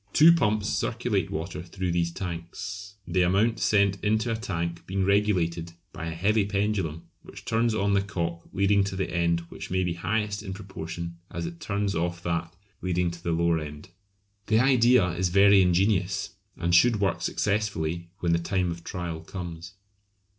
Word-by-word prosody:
Two 160 +3 +8
pumps 105 -9 +1
circulate 115 -8 -1
water 85 +3 -4
through 90 +1 -3
these 85 0 0
tanks, 95 +3 -6
the 90 +2 +1
amount 100 +6 +2
sent 100 -2 +2
into 110 +2 +1
a - - +1
tank 85 -7 -4
being 95 0 0
regulated 90 -5 +1 0.2
by 85 - -5
a 80 - -4
heavy 105 +5 +2
pendulum 100 -5 -1 0.2
which - - -12
turns 115 0 +1
on 100 -1 +1
the 100 - +3
cock 85 -4 -3
leading 100 +1 +3
to 95 - -4
the 95 -2 -2
end 85 0 +1
which - - -8
may 95 +1 +1
be 90 -1 -1
highest 105 +4 -1
in 95 -2 -6
proportion 85 -3 -7
as - - -4
it 170 0 -7
turns 100 -6 -1
off 85 +1 -2
that 85 -1 -2 0.3
leading 90 -1 0
to 85 0 -10
the 85 - -1
lower 85 0 +2
end. 75 +3 -8 0.6
The 110 +1 +4
idea 125 -5 +5
is 90 +2 0
very 100 +2 +6
ingenious, 95 +2 +1 0.3
and 85 +1 -1
should 110 +5 +5
work 95 -3 0
successfully 85 -5 -1
when 85 -1 +2
the 85 - +2
time 90 0 0
of 85 0 -7
trial 85 -3 -4
comes. 85 0 -8
95 Hz, 175 wpm, -27 LUFS, 85-105 Hz, 0.6 s, Two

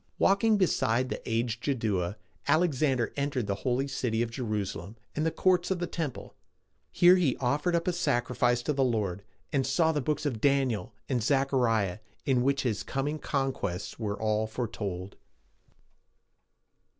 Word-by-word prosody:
Walking 210 +3 +4
beside 130 - +2
the - - -4
aged 115 +1 -1
Jaddua, 105 -9 0 0.3
Alexander 145 -5 +2
entered 140 -4 -1
the 100 - -1
holy 130 +2 0
city 120 -4 -1
of 115 - -4
Jerusalem 105 -5 -3 0.2
and 155 +2 +1
the - - +4
courts 180 +1 +2
of 190 - +1
the 175 - -2
temple. 160 -6 -5 0.6
Here 180 +1 +6
he 160 -8 +1
offered 145 +7 +1
up 170 +1 0
a 180 - +2
sacrifice 120 -4 +1
to 150 - 0
the 135 -1 +2
Lord, 105 -6 0 0.3
and 135 -2 +2
saw 160 +5 +2
the 150 -2 -1
Books 150 +3 -1
of 120 -7 -2
Daniel 135 -9 +1 0.2
and 125 -3 0
Zech 135 +3 +1
a - - +3
ri´ah, 110 -6 +1 0.3
in 130 -3 +3
which 135 +2 +1
his 115 -5 -1
coming 145 +3 -2
and - - -16
conquests 130 - -2
were 105 -2 -3
all 110 0 +1
foretold. 100 -5 -4
130 Hz, 160 wpm, -29 LUFS, 110-145 Hz, 0.6 s, Here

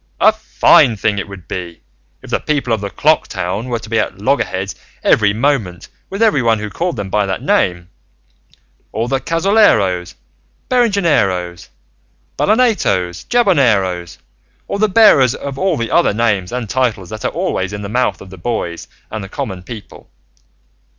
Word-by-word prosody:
A - - +6
fine 115 - +4
thing 100 0 0
it 100 - -5
would 100 -3 -11
be 85 -2 -6 0.4
if - - -11
the - - +1
people 140 -6 -1
of 110 - -1
the 100 - -4
clock - - +2
town 100 +8 -4
were 120 - -1
to 110 - -10
be 110 0 0
at 100 - -2
loggerheads 100 -4 -1 0.3
every 105 -2 +4
moment 110 -6 -1 0.2
with 200 +3 -1
everyone 125 - +3
who 105 0 -6
called 175 -2 -2
them 100 -3 -5
by 105 -1 +1
that 95 -2 -3
name, 85 -1 +1 1.0
or 115 +2 -2
the 135 +1 0
Cazoleros, 150 - +2 0.5
Berengeneros, 165 - +1 0.7
Ballenatos, 200 - +1
Jaboneros, 115 - +2 0.5
or 200 - -3
the 215 0 +3
bearers 185 - +5
of 140 -1 -6
all 190 -4 +1
the 115 -1 -3
other - - +3
names 105 -5 0
and 125 -2 -3
titles 115 -7 -1
that 110 0 -7
are - - +1
always 95 +1 -2
in 105 0 -6
the - - -4
mouth 110 -3 -1
of 95 - -12
the 95 - -11
boys 85 -4 -4 0.2
and 105 -3 -6
common 95 -3 -5
people! 105 +3 -11
110 Hz, 160 wpm, -16 LUFS, 95-140 Hz, 1.0 s, A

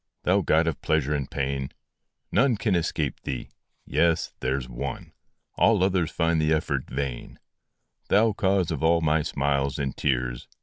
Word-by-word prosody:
Thou 95 +3 +3
god 80 -2 +3
of 80 -3 -2
pleasure 75 -2 +1
and 70 -3 -2
of - - -35
pain! 70 -1 -2 0.6
None 125 -4 +3
can 105 0 0
escape 80 -5 -1
thee 65 - -5 0.4
yes 85 -1 +1
there 65 +1 0
s 65 -3 -5
one - - -6 0.4
All - - +4
others 90 -4 +1
find 80 -1 +1
the 75 0 +1
effort 70 -4 -2
vain: 65 -2 -4 0.7
Thou 110 +1 +4
cause 95 -3 +1
of - - -3
all 85 +1 +3
my 80 0 +2
smiles 70 -2 0
and 70 -2 -2
tears 60 -3 -1
75 Hz, 165 wpm, -26 LUFS, 70-85 Hz, 0.7 s, All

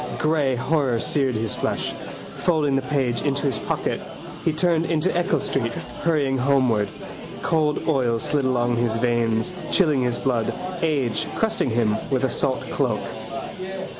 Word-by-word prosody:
Grey 150 -4 +2
horror 130 -1 +1
seared 130 +1 +1
his 110 0 0
flesh. - - -2 0.4
Folding 155 -5 +2
the 135 - +2
page 130 -3 0
into 140 -1 0
his 135 -7 +1
pocket - - -2 0.4
he 165 - +2
turned 165 +1 +1
into 160 -1 +1
Eccles 175 +3 +1
street, 115 -3 -1 0.3
hurrying 145 -5 +1
homeward. 125 -6 +3 0.6
Cold 155 -2 +1
oils 125 -7 +1
slid 145 -3 +1
along 120 -2 +1
his 120 -1 +1
veins, 115 +3 +1 0.2
chilling 155 -8 +3
his 120 -1 0
blood: 120 -4 0 0.3
age 140 -9 0
crusting 220 - +1
him 110 -2 +2
with 130 -1 +1
a 130 - +3
salt 135 +2 0
cloak. - - 0
135 Hz, 145 wpm, -23 LUFS, 120-150 Hz, 0.6 s, homeward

